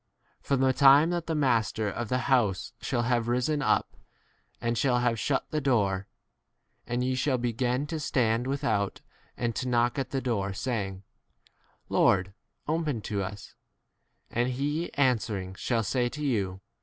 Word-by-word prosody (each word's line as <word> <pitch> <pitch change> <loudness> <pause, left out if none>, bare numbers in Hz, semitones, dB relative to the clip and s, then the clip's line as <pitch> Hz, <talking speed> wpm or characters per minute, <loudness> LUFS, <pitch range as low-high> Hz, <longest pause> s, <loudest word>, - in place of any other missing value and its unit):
From 135 -2 0
the 130 0 +4
time 140 +5 +6
that 175 -1 -2
the 165 - -1
master 115 -6 +1
of 110 +3 -3
the 125 - +1
house 115 -9 +1
shall 120 - -1
have 120 -1 +1
risen 125 +5 +1
up - - +1 0.6
and 115 0 -1
shall 125 +1 +2
have 120 -2 +1
shut 135 +4 -1
the 155 -1 0
door, 100 -8 +1 0.8
and 120 +1 -1
ye 130 +1 0
shall 130 +1 +1
begin 125 +3 -1
to 160 +1 -4
stand 120 -4 +1
without 115 -8 -1 0.4
and 120 -2 -1
to 130 - -2
knock 120 +1 +2
at 135 - -2
the 135 - -1
door, 100 -7 -1
saying, 100 -4 -3 0.8
Lord,? 95 0 +3 0.3
open 155 -6 -1
to 100 0 -2
us; 100 +2 -7 0.8
and 120 +2 +1
he 145 +6 -2
answering 110 -8 0
shall 115 +4 -1
say 120 +4 0
to 150 +3 -5
you. 95 -8 -1
120 Hz, 155 wpm, -28 LUFS, 110-135 Hz, 0.8 s, time